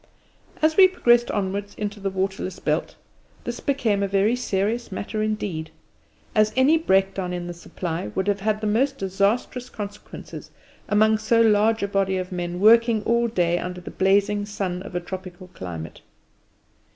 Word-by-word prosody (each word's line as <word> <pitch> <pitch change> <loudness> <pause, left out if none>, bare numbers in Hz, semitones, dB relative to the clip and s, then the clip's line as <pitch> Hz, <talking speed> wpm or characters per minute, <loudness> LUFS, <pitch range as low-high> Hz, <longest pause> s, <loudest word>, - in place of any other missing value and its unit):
As 315 0 +3
we 380 -1 +9
progressed 240 -10 +3
onwards 200 0 -3
into 210 0 -4
the 195 0 -2
waterless 190 -1 -3
belt, - - -2 0.5
this 240 - -5
became 235 -8 0
a 200 - +1
very 200 +4 +2
serious 225 0 -1
matter 210 +3 -4
indeed, 205 -7 -2 0.6
as 215 0 +3
any 265 +5 +5
breakdown 195 - +1
in 175 -1 -4
the 175 - -5
supply 170 0 -5
would 190 +1 -1
have 205 -1 +1
had 215 +1 -1
the - - -2
most 260 +6 +1
disastrous 200 +6 -1
consequences 205 -1 -8 0.4
among 215 +1 +4
so 225 +2 +2
large 220 -1 +3
a - - +1
body 195 -1 0
of 185 0 -4
men 175 -1 -4
working 225 +1 +5
all 235 +2 +2
day 175 -6 +1
under 180 0 -5
the 180 - -9
blazing 200 +2 +2
sun 195 -3 -3
of 190 -1 -9
a - - +1
tropical 185 0 -8
climate. 85 - -8
200 Hz, 165 wpm, -24 LUFS, 185-220 Hz, 0.6 s, we